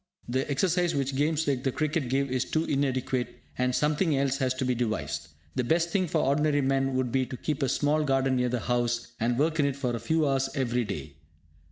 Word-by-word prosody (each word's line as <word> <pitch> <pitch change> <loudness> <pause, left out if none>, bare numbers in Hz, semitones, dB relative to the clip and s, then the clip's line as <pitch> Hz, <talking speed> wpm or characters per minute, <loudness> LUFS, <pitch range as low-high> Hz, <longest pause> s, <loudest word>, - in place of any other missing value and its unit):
The 130 +4 -1
exercise 175 +3 +1
which 135 -1 -1
games 155 +2 +1
like 135 -3 +1
the 135 - 0
cricket 155 -2 -1
give 135 +1 0
is 130 -1 +1
too 160 +1 -1
inadequate, 130 -2 -1 0.2
and 125 0 0
something 150 +1 +2
else 135 0 +1
has 130 -2 0
to 130 - -2
be 125 - +2
devised. 85 - -2 0.3
The 130 - 0
best 165 +7 +2
thing 185 -3 +1
for - - +1
ordinary 145 +1 +2
men 135 0 +1
would 130 -2 0
be 130 0 +1
to 130 - -6
keep 150 +1 -3
a 135 - +1
small 150 +4 +2
garden 135 -2 +2
near 125 0 +1
the 120 -1 -1
house, 120 0 0
and 120 +2 +1
work 155 +3 +1
in 145 - +4
it 140 - -1
for 125 -4 -2
a - - -3
few 160 +2 +1
hours 135 -1 +1
every 125 -3 0
day. 80 -8 -6
135 Hz, 225 wpm, -28 LUFS, 125-150 Hz, 0.3 s, in